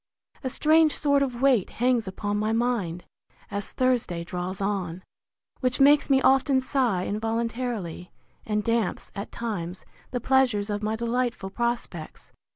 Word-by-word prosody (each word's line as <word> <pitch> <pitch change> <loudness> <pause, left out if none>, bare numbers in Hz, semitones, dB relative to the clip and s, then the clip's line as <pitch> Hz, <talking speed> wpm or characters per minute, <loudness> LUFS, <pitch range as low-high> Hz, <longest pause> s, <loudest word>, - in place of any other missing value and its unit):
A 260 - -1
strange 310 +3 +4
sort 285 -2 +2
of 255 -2 -2
weight 255 -8 +4
hangs 245 -2 +1
upon 205 +2 -2
my 215 +1 0
mind, 225 -8 -1 0.5
as 200 0 -4
Thursday 240 -10 0
draws 180 +2 -4
on, 190 -3 -2 0.6
which 255 0 0
makes 285 +2 +5
me 270 -1 +5
often 270 0 +4
sigh 245 -8 0
involuntarily, 225 -4 -3 0.3
and 210 -1 -1
damps, 230 -3 -1
at 200 +1 -6
times, 190 -6 -4 0.2
the 245 - -2
pleasures 245 -5 +2
of 205 0 -2
my 215 +1 -1
delightful 235 -3 -2
prospects! 235 -9 -4
230 Hz, 140 wpm, -26 LUFS, 200-255 Hz, 0.6 s, makes